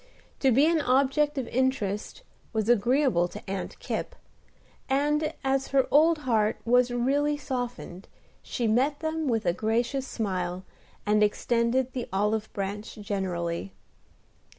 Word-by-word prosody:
To 270 Hz, -, +3 dB
be 270 Hz, +5 st, +5 dB
an 325 Hz, -1 st, +3 dB
object 280 Hz, +3 st, +2 dB
of 260 Hz, -3 st, -2 dB
interest 250 Hz, -, -1 dB, 0.3 s
was 220 Hz, -1 st, 0 dB
agreeable 240 Hz, -4 st, +3 dB
to -, -, -10 dB
Aunt 195 Hz, 0 st, -4 dB
Kipp; -, -, -4 dB, 0.7 s
and, 295 Hz, +3 st, +1 dB
as 270 Hz, 0 st, +1 dB
her 270 Hz, -1 st, +2 dB
old 320 Hz, +3 st, +5 dB
heart 220 Hz, -3 st, +1 dB
was 245 Hz, +1 st, +4 dB
really 280 Hz, +5 st, +1 dB
softened, 245 Hz, -9 st, -5 dB, 0.3 s
she 240 Hz, -, -3 dB
met 260 Hz, +7 st, +1 dB
them 315 Hz, -1 st, -2 dB
with 225 Hz, -3 st, 0 dB
a 175 Hz, -, +2 dB
gracious 240 Hz, +7 st, -1 dB
smile, 185 Hz, -5 st, -3 dB, 0.4 s
and 210 Hz, 0 st, +3 dB
extended 235 Hz, +4 st, +1 dB
the 250 Hz, -2 st, -4 dB
olive 210 Hz, +3 st, 0 dB
branch 200 Hz, +2 st, -5 dB
generally. 175 Hz, -, -3 dB
240 Hz, 130 wpm, -27 LUFS, 210-275 Hz, 0.7 s, be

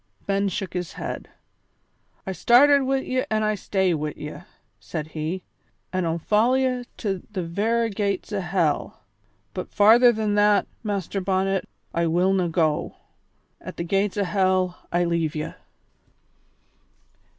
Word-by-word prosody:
Ben 200 Hz, 0 st, +1 dB
shook 190 Hz, 0 st, -4 dB
his 180 Hz, -2 st, -4 dB
head. -, -, -6 dB, 1.0 s
"I 190 Hz, -, -3 dB
started 275 Hz, -, +5 dB
wi' 270 Hz, 0 st, +1 dB
ye 255 Hz, 0 st, 0 dB
an' 215 Hz, 0 st, +1 dB
I 215 Hz, 0 st, +2 dB
stay 190 Hz, -2 st, 0 dB
wi' 150 Hz, -1 st, -3 dB
ye," 150 Hz, -, -7 dB, 0.4 s
said 155 Hz, -2 st, -5 dB
he, 160 Hz, +4 st, -4 dB, 0.5 s
"an' 185 Hz, -1 st, 0 dB
I'll 165 Hz, 0 st, 0 dB
follow 215 Hz, +8 st, +2 dB
ye 255 Hz, -2 st, 0 dB
to 195 Hz, -5 st, -2 dB
the 190 Hz, -4 st, -3 dB
vera 225 Hz, +7 st, 0 dB
gates 200 Hz, 0 st, -2 dB
o' 205 Hz, -, 0 dB
hell, 175 Hz, -4 st, -1 dB, 0.5 s
but -, -, -5 dB
farther 230 Hz, +4 st, +6 dB
than 215 Hz, -2 st, -1 dB
that, 205 Hz, 0 st, +4 dB, 0.2 s
Master 200 Hz, -2 st, -2 dB
Bonnet, 190 Hz, 0 st, 0 dB, 0.2 s
I 170 Hz, 0 st, +1 dB
willna 180 Hz, +2 st, +2 dB
go; 160 Hz, -2 st, 0 dB, 0.7 s
at -, -, -8 dB
the -, -, -2 dB
gates 195 Hz, +3 st, 0 dB
o' 205 Hz, -, +2 dB
hell 185 Hz, -2 st, 0 dB
I 175 Hz, +1 st, +2 dB
leave 170 Hz, -2 st, 0 dB
ye!" 155 Hz, +1 st, -4 dB
195 Hz, 145 wpm, -24 LUFS, 170-210 Hz, 1.0 s, farther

